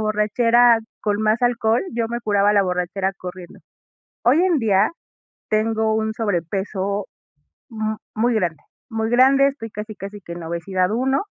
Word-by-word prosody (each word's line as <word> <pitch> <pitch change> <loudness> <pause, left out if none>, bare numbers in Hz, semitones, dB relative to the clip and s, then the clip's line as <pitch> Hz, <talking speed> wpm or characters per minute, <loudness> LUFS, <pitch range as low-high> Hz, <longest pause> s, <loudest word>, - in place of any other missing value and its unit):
borrachera 230 +3 +3 0.2
con 210 0 0
más 220 +3 +2
alcohol, 235 -1 +2
yo 230 -1 -1
me 235 +1 -3
curaba 205 -1 +2
la 200 -1 +4
borrachera 185 +1 -1
corriendo. 180 -1 -9 0.6
Hoy 285 +9 +4
en 360 -4 +3
día 210 -3 +3 0.6
tengo 220 0 +1
un 220 0 -1
sobrepeso, 200 0 -2 0.6
m 220 -1 -3 0.2
muy 235 +3 +2
grande, 175 -6 0 0.3
muy 225 -1 -2
grande, 270 +3 +5
estoy 270 -5 -5
casi 210 0 -7
casi 200 +1 -8
que 170 - -8
en 170 -1 -8
obesidad 180 +3 -1
1 265 - 0
215 Hz, 145 wpm, -21 LUFS, 195-230 Hz, 0.6 s, grande